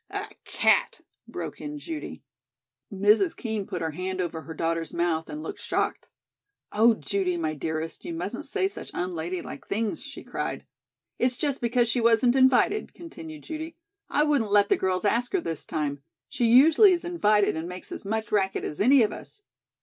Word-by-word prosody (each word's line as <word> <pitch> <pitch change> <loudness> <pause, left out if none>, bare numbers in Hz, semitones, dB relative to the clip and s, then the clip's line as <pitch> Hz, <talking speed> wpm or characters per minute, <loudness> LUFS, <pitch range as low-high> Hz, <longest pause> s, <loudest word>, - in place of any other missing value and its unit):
A - - -4 0.2
cat!" - - +2 0.3
broke - - -6
in 295 0 -5
Judy. 315 +1 -7 0.7
Mrs. 210 - +3
Kean 220 -5 -3
put 175 -2 -4
her 160 - -1
hand 185 +4 -4
over 170 -3 -2
her 160 0 -9
daughter's 165 +1 -2
mouth 165 -2 0
and 305 +1 -6
looked 410 - -6
shocked. - - -2 0.6
"Oh, 225 +2 +5
Judy, 190 -4 -1
my 160 -2 -1
dearest, 160 +2 -4
you 345 - -5
mustn't 330 - -4
say 390 -2 0
such 395 - -9
unladylike 175 0 -4
things," 220 +7 -2
she - - -9
cried. - - -4 0.5
"It's 245 0 +2
just 285 -3 -1
because 240 0 +2
she 240 +1 +1
wasn't 235 +2 +4
invited," 265 +11 +3
continued 325 -2 -10
Judy. 320 0 -6 0.3
"I 295 - +2
wouldn't 285 -8 +1
let 205 -1 +4
the - - +5
girls 185 +1 -1
ask 235 +4 +1
her 385 - +3
this 165 - -5
time. 145 -3 -2 0.3
She 240 - -1
usually 315 - +7
is 345 0 -2
invited 210 - +2
and 160 +2 -4
makes 180 0 -8
as - - -6
much 220 +1 -3
racket 195 -2 +1
as 150 - -4
any 255 +3 +6
of 210 - 0
us." 415 - -11
220 Hz, 180 wpm, -26 LUFS, 180-295 Hz, 0.7 s, usually